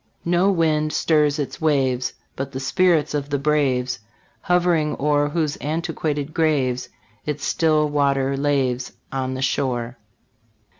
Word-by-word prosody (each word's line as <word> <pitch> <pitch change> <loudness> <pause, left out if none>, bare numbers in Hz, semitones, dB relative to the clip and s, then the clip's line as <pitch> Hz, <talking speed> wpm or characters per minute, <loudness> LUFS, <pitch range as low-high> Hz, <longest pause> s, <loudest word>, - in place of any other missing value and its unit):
"No 175 +3 +3
wind 155 -4 +1
stirs 150 -2 +2
its 145 +1 -4
waves, 135 -5 +1 0.2
But 135 +1 -5
the 130 - -3
spirits 165 +3 +2
of 145 -1 -2
the 140 - 0
braves 130 -4 +1 0.5
Hov'ring 175 -4 +2
o'er, 145 0 +2
Whose 155 -1 -1
antiquated 150 -1 -2
graves 130 -6 +1 0.4
Its 150 -1 -2
still 155 -2 +2
water 140 -2 +1
laves 135 -3 0 0.2
On 130 -1 -2
the 130 - -3
shore." 125 -3 -1
145 Hz, 130 wpm, -22 LUFS, 135-155 Hz, 0.5 s, No